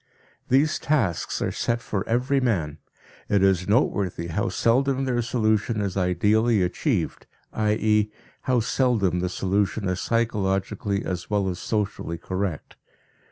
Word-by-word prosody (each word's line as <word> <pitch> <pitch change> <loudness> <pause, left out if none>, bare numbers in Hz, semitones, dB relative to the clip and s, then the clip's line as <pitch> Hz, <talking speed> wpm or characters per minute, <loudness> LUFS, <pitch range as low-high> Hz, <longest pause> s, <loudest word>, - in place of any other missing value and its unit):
These 140 +5 +3
tasks 120 - 0
are - - -1
set 115 0 -1
for 100 -4 -3
every 125 +4 +2
man; 80 - -1 0.5
it 100 -2 +3
is 95 -2 +2
noteworthy 100 -6 +1
how 95 +5 -1
seldom 130 +7 +1
their 125 -2 0
solution 110 -2 0
is 100 -3 -2
ideally 105 +4 +2
achieved, 90 - -1 0.3
i.e., 105 0 +1 0.3
how 125 -2 +1
seldom 110 -7 +1
the 90 0 -1
solution 100 +2 0
is 90 -1 -1
psychologically 100 -3 -1
as 90 -1 -4
well 100 -2 +1
as 90 -1 -4
socially 100 -6 -2
correct. 95 -1 -4
105 Hz, 130 wpm, -24 LUFS, 95-115 Hz, 0.5 s, These